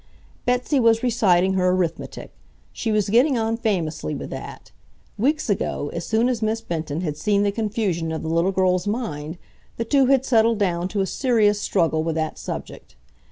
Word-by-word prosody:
Betsy 250 +3 +1
was 230 -1 +3
reciting 190 -6 +3
her 185 -1 +2
arithmetic. 180 -3 -2 0.4
She 225 - -2
was 210 -2 +1
getting 255 +4 +4
on 225 0 0
famously 170 - -2
with - - -7
that. - - -8 0.4
Weeks 295 +7 0
ago, 190 -7 -1
as 170 0 -5
soon 225 +2 +2
as 245 -3 -1
Miss 220 +1 0
Benton 160 -4 -4
had 150 -4 -3
seen 205 +3 +1
the 200 - +2
confusion 200 -6 -2
of 160 - -4
the - - -4
little 170 +4 +1
girl's 185 0 +1
mind, 170 -8 -3 0.4
the 230 - -2
two 270 +2 +3
had 265 -1 +3
settled 230 -2 +3
down 180 -3 0
to 200 +1 -2
a - - +1
serious 210 -2 +2
struggle 160 -4 +1
with 160 0 -2
that 160 -1 -2
subject. - - -7
205 Hz, 180 wpm, -23 LUFS, 170-230 Hz, 0.4 s, getting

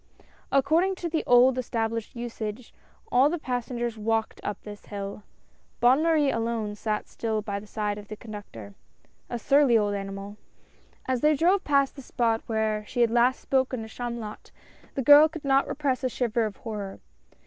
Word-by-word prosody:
According 315 +8 +3
to 350 -2 -4
the 320 -1 -1
old 250 +1 +6
established 230 -1 -3
usage, 230 -1 -6 0.4
all 260 +4 +5
the 345 - -1
passengers 240 -4 -3
walked 225 +1 -1
up 205 - -3
this 205 -1 -10
hill. 200 0 -6 0.6
Bonne 250 +5 +5
Marie 315 -4 +3
alone 230 -2 -2
sat 210 0 -3
still 220 -2 -3
by 200 -2 -3
the 210 - -13
side 210 -1 -2
of 205 - -12
the 215 - -7
conductor 205 - -10 0.3
— - - -35
a 240 - -3
surly 275 -1 +4
old 205 -1 +1
animal. 195 +1 -6 0.7
As 255 -2 0
they 305 0 +4
drove 365 +6 +3
past 280 -2 +2
the 275 - -9
spot 230 -3 0
where 220 -1 0
she 245 - -1
had 235 -1 +4
last 240 +2 +3
spoken 260 -3 0
to - - -8
Chamulot, 235 -2 -6 0.5
the 270 - -1
girl 295 +4 +8
could 315 -2 -9
not 275 0 +3
repress 275 -3 -1
a 255 - +1
shiver 235 -2 0
of 205 - -9
horror. 205 -4 -6
235 Hz, 175 wpm, -26 LUFS, 215-270 Hz, 0.7 s, girl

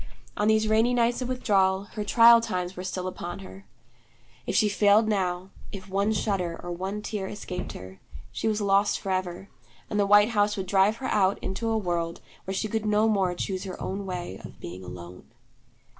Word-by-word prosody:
On 210 - 0
these 220 0 +3
rainy 225 +3 +3
nights 240 +1 +1
of 250 - -3
withdrawal, 195 -6 +2
her 210 - -3
trial 230 +2 +7
times 180 -4 -3
were 180 - -6
still 185 0 -3
upon 175 -1 -6
her. 195 +1 -12 0.8
If - - -1
she 215 - +4
failed 205 +1 +4
now, 185 -2 -1 0.2
if 195 -1 -8
one 200 +3 +1
shudder 195 -5 -1
or 175 - -5
one 190 +4 -4
tear 210 -3 -4
escaped 185 -3 -6
her, 95 +1 -10 0.3
she 130 - -3
was 215 -1 0
lost 200 0 +2
forever; 185 -1 -3 0.4
and 210 - 0
the 200 - +2
white 205 +2 +6
house 205 -2 +1
would 190 - -3
drive 195 +3 +3
her 260 - -5
out, 195 -2 +2
into 225 +4 -2
a 225 - +1
world 170 -4 -2 0.3
where 190 - -3
she 215 - -1
could 215 0 -2
no 210 +1 +3
more 190 -4 +1
choose 185 +1 -3
her 185 - -7
own 195 +1 -4
way 175 - -5
of - - -11
being 90 +2 -8
alone. 90 0 -10
195 Hz, 195 wpm, -26 LUFS, 185-215 Hz, 0.8 s, trial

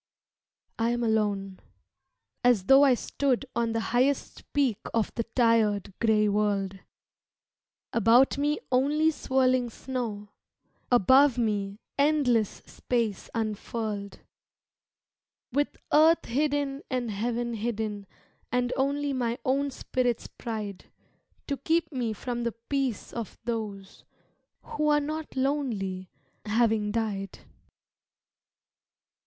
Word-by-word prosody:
I 230 +1 +2
am 240 0 0
alone, 205 -4 0 0.8
as 245 -6 +4
though 270 +4 +7
I 270 -3 +6
stood 275 +1 -1
On 235 -1 +1
the 225 - 0
highest 265 +3 0
peak 265 -7 +1 0.2
of 225 -2 0
the 230 - -2
tired 220 -5 +2
gray 215 -2 +3
world, 200 -2 0 1.1
About 235 +4 +5
me 295 +1 +1
only 295 +5 +3
swirling 255 -4 +1
snow, 225 -4 -5 0.6
Above 260 +3 +5
me, 205 -3 -1 0.2
endless 280 -8 +2
space 230 -5 -2
unfurled; 215 -2 -3 1.3
With 285 +3 0 0.2
earth 320 +2 +5
hidden 285 +1 0
and 250 -4 -1
heaven 235 +3 -2
hidden, 215 -2 -3 0.4
And 250 0 +1
only 280 +1 0
my 240 -2 -1
own 275 +2 +1
spirit's 250 -3 -1
pride 210 -4 -6 0.6
To 280 - -2
keep 325 +3 0
me 245 -5 -2
from 240 +2 -4
the 235 -1 -1
peace 255 +1 -3
of 230 -3 -6
those 215 -4 -5 0.6
Who 300 0 -2
are 295 0 +4
not 305 +1 -5
lonely, 230 -10 -1 0.4
having 220 -1 +2
died. 205 -4 -2
235 Hz, 105 wpm, -28 LUFS, 215-270 Hz, 1.3 s, though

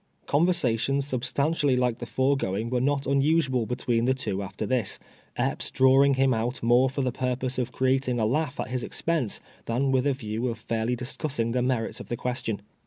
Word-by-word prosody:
Conversations 140 -5 +1
snbstantially 140 +1 0
like 125 -2 0
the 120 - -6
foregoing 115 -6 0
were 125 -1 +1
not 140 +1 +1
unnsnal 140 -3 +2
between 120 -2 0
the 130 +1 +2
two 100 -7 -2
after 95 0 -5
this; 125 -6 0 0.4
Epps - - -1
drawing 135 +1 +5
him 130 0 +3
out 120 +3 -2
more 120 +3 +4
for 135 +1 -2
the 130 - 0
purpose 130 +1 -2
of 125 - -2
creating 130 -1 +1
a 110 - +2
laugh 145 +4 -1
at - - -3
his 125 0 -2
expense, 155 -5 -1 0.2
than 130 +4 0
with 130 +1 +2
a 140 - +3
view 115 -1 -3
of 115 -2 -3
fairly 115 +2 -1
discussing 125 -1 -3
the 125 +1 0
merits 125 -3 -1
of - - -9
the 120 - -3
question. 120 -4 -2
125 Hz, 185 wpm, -26 LUFS, 115-135 Hz, 0.4 s, drawing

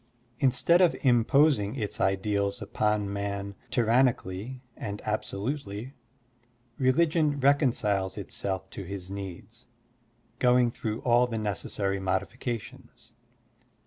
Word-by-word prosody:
Instead 155 +6 +4
of 175 -3 +4
imposing 125 -2 +4
its 110 -6 -4
ideals 100 +2 0
upon 105 -1 -1
man 100 0 -3 0.2
tyran 120 +2 +4
nically 110 +6 -8
and 105 0 -5
absolutely, 110 +2 -3 0.9
religion 150 +2 +2
reconciles 120 -9 +2
itself 95 -1 -4
to - - -7
his 95 0 -7
needs, 100 +5 -8 0.7
going 125 -1 +4
through 110 -1 -4
all 120 0 +4
the 115 -2 -3
necessary 100 -1 -2
modifications. 110 +5 -4
110 Hz, 100 wpm, -28 LUFS, 100-130 Hz, 0.9 s, Instead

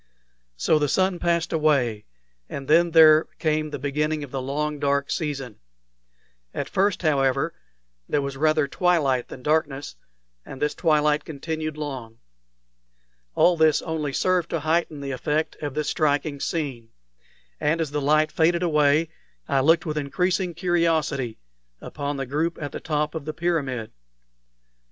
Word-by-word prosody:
So 155 - +2
the 145 -1 0
sun 185 +1 +1
passed 170 0 0
away, 135 -9 +1 0.4
and 135 -1 -6
then 170 +3 +5
there 160 -1 +7
came 155 -1 0
the 145 - -5
beginning 150 +2 -1
of 140 - -9
the 135 - -3
long 150 +3 -2
dark 140 0 0
season. 135 - -3 1.0
At - - -2
first, 195 0 0
however, 135 0 +1 0.6
there 145 - +1
was 140 0 -4
rather 155 +1 +2
twilight 140 -7 +1
than 125 - -10
darkness, 150 - -1 0.5
and 135 - -10
this 150 0 0
twilight 150 -2 +2
continued 155 +1 -5
long. 130 -7 -6 1.2
All 180 - +5
this 160 -2 +3
only 155 -3 -2
served 180 +4 +1
to 165 - -2
heighten 160 -1 0
the 140 -1 -4
effect 150 +4 -1
of 145 -2 -5
this 150 -1 -1
striking 145 -1 0
scene; 135 -8 -3 0.7
and 160 +3 +1
as 160 -3 -2
the 150 0 -1
light 155 +2 +3
faded 170 +2 +2
away, 150 -1 +3 0.4
I 140 - +2
looked 165 +6 +3
with 155 -2 -2
increasing 180 +4 -1
curiosity 160 - 0 0.4
upon 145 -1 -5
the 135 - -3
group 155 +6 -1
at 145 -2 -5
the - - -6
top 150 -1 -1
of 160 -3 -5
the 155 - -4
pyramid. 140 -10 -2
150 Hz, 150 wpm, -24 LUFS, 140-160 Hz, 1.2 s, there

